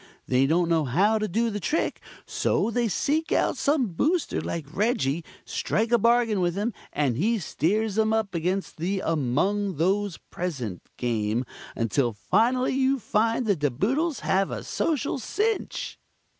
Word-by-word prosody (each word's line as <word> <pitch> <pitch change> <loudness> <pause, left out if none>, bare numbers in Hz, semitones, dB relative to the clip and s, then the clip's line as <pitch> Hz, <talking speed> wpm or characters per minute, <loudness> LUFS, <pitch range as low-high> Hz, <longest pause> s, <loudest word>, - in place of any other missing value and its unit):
They 130 +1 +3
don't 170 +3 +2
know 165 -2 +2
how 200 - +2
to 215 - -1
do 225 +5 0
the 205 - -3
trick, 310 - -1 0.2
so 230 - 0
they 240 0 +1
seek 300 - 0
out - - +2
some 280 -6 +1
Booster 310 - 0
like 165 -3 -4
Reggie, 170 - +1 0.2
strike 225 +2 -1
a 235 - +5
bargain 230 -3 +3
with 175 -1 +1
him, 210 +4 -1 0.2
and 135 -6 0
he 225 - +2
steers 205 +5 0
'em 220 0 +3
up 220 -3 0
against 180 +3 -2
the 190 +4 -1
'Among 165 +7 0
Those 195 +3 +1
Present' 130 - -4 0.2
Game 115 0 -1 0.3
until 115 +2 +1
finally 240 - +2
you 270 +1 +2
find 230 +1 +1
the 205 -3 +3
De 145 -3 0
Boodles 270 - 0
have 195 0 +1
a - - -5
social 290 -4 -1
cinch." 420 - -2
200 Hz, 155 wpm, -26 LUFS, 160-235 Hz, 0.3 s, a